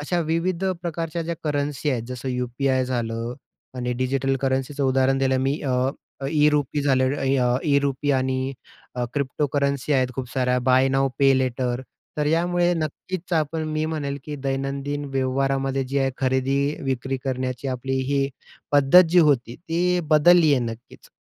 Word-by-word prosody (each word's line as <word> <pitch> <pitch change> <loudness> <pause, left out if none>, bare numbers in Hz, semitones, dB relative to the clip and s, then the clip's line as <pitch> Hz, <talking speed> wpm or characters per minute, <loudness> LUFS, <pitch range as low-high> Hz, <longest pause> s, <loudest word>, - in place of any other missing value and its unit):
अशा 175 +4 -1
विविध 165 +3 -1 0.2
प्रकारच्या 165 -1 -3
ज्या 170 +1 -3
करन्सी 145 -1 -1
आहेत. 125 -4 -1
जसं 125 +1 -5
यू-पी-आय 130 +1 0
झालं 120 -1 -3 0.4
आणि 125 -1 -2
डिजिटल 135 +2 0
करन्सीचं 135 +1 -1
उदाहरण 135 0 +2
दिलं 130 -1 +2
मी 145 +3 -1
अ, 130 -1 +1 0.4
ई-रुपी 150 -1 +2
झाले, 135 -2 +3 0.4
अ, 125 0 +2
ई-रुपी 140 -1 +1
आणि 130 +1 -1 0.6
क्रिप्टोकरन्सी 140 0 -1
आहेत. 130 -2 +2
खूप 130 -2 -4
साऱ्या, 125 -1 +1
बाय 130 +1 +5
नाऊ 135 0 +2
पे 135 -1 +5
लेटर, 125 -1 -1 0.4
तर 150 - +1
यामुळे 175 +2 +2
नक्कीच 170 +3 -5
आपण 155 +1 -1
मी 155 0 -1
म्हणेल, 145 -3 -3
की 150 -1 -5
दैनंदिन 140 +1 -2
व्यवहारामध्ये 135 +1 0
जी 140 +1 0
आहे 135 -1 +1
खरेदी 130 +1 +1 0.3
विक्री 135 0 -2
करण्याची 130 0 -3
आपली 130 +1 -2 0.2
ही 140 -1 +1 0.4
पद्धत 145 +5 +7
जी 180 +2 +4
होती, 135 -7 +3
ती 175 +1 0
बदलली 155 +1 +6
आहे, 130 - +1
नक्कीच. 115 +2 -15
135 Hz, 145 wpm, -23 LUFS, 130-150 Hz, 0.6 s, पद्धत